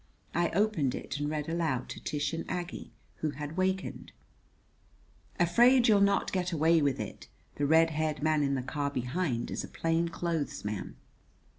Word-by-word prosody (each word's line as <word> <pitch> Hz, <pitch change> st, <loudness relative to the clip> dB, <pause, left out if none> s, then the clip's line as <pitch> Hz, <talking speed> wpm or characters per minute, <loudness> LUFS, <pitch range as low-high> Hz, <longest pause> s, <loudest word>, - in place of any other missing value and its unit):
I 170 Hz, 0 st, +2 dB
opened 195 Hz, -10 st, +2 dB
it 140 Hz, -, -5 dB
and 145 Hz, 0 st, -1 dB
read 150 Hz, -1 st, -3 dB
aloud 160 Hz, -7 st, -1 dB
to -, -, -8 dB
Tish 145 Hz, +1 st, -2 dB
and 165 Hz, -, -2 dB
Aggie, 180 Hz, -1 st, -5 dB, 0.3 s
who 155 Hz, -, -1 dB
had 150 Hz, +2 st, -6 dB
wakened: 190 Hz, +1 st, -2 dB, 1.3 s
"'Afraid 240 Hz, +9 st, +5 dB
you'll 210 Hz, -3 st, +5 dB
not 200 Hz, 0 st, +2 dB
get 180 Hz, -1 st, -1 dB
away 165 Hz, 0 st, +3 dB
with 140 Hz, -2 st, +1 dB
it! -, -, -6 dB, 0.3 s
The 145 Hz, -, +1 dB
red 160 Hz, +2 st, +5 dB
haired 155 Hz, -1 st, -1 dB
man 155 Hz, -1 st, +3 dB
in 140 Hz, -1 st, +1 dB
the 130 Hz, -, -2 dB
car 145 Hz, +2 st, -2 dB
behind 125 Hz, -1 st, -2 dB
is -, -, -3 dB
a -, -, -6 dB
plain 165 Hz, +1 st, 0 dB
clothes 160 Hz, -7 st, -3 dB
man.'" 105 Hz, -2 st, -4 dB
160 Hz, 170 wpm, -30 LUFS, 145-175 Hz, 1.3 s, Afraid